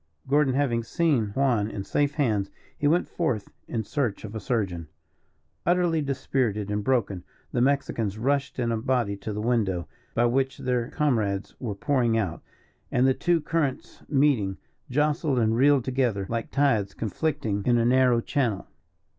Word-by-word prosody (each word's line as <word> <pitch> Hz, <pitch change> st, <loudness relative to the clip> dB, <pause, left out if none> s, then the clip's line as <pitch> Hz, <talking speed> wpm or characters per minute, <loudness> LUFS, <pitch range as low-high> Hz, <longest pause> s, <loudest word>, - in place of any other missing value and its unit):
Gordon, 140 Hz, -1 st, +3 dB
having 130 Hz, -5 st, +1 dB
seen 140 Hz, -4 st, +1 dB
Juan 120 Hz, -6 st, +2 dB
in 100 Hz, -3 st, -5 dB
safe 145 Hz, +7 st, 0 dB
hands, 110 Hz, -9 st, +1 dB, 0.3 s
he 145 Hz, -, 0 dB
went 170 Hz, +4 st, +2 dB
forth 120 Hz, -, -2 dB, 0.2 s
in 115 Hz, -2 st, -2 dB
search 120 Hz, -2 st, -2 dB
of 105 Hz, -, -8 dB
a 110 Hz, -, -4 dB
surgeon. 95 Hz, -7 st, -2 dB, 0.8 s
Utterly 175 Hz, -2 st, +2 dB
dispirited 130 Hz, -7 st, -1 dB
and 105 Hz, 0 st, -1 dB
broken, 105 Hz, -8 st, 0 dB, 0.3 s
the 120 Hz, -, 0 dB
Mexicans 120 Hz, -6 st, 0 dB
rushed 140 Hz, +4 st, 0 dB
in 120 Hz, -2 st, 0 dB
a 115 Hz, -, 0 dB
body 115 Hz, -3 st, 0 dB
to 105 Hz, +2 st, -5 dB
the 105 Hz, +1 st, -3 dB
window, 105 Hz, -8 st, 0 dB, 0.3 s
by 120 Hz, -, +3 dB
which 135 Hz, +2 st, +1 dB
their 125 Hz, -3 st, -1 dB
comrades 110 Hz, -11 st, 0 dB
were 110 Hz, -6 st, -4 dB
pouring 120 Hz, 0 st, +1 dB
out; 100 Hz, -7 st, -2 dB, 0.5 s
and, 125 Hz, -, +3 dB
the 130 Hz, -, +4 dB
two 170 Hz, +4 st, +1 dB
currents 150 Hz, -3 st, -2 dB
meeting, 135 Hz, -10 st, +2 dB, 0.3 s
jostled 150 Hz, +1 st, +1 dB
and 110 Hz, -1 st, +2 dB
reeled 135 Hz, 0 st, +4 dB
together 125 Hz, -7 st, 0 dB
like 115 Hz, -1 st, -2 dB
tides 135 Hz, -8 st, +1 dB
conflicting 115 Hz, -, -2 dB
in 120 Hz, -1 st, +4 dB
a 115 Hz, -, +2 dB
narrow 125 Hz, -1 st, +4 dB
channel. 120 Hz, -8 st, -1 dB
125 Hz, 160 wpm, -26 LUFS, 110-140 Hz, 0.8 s, the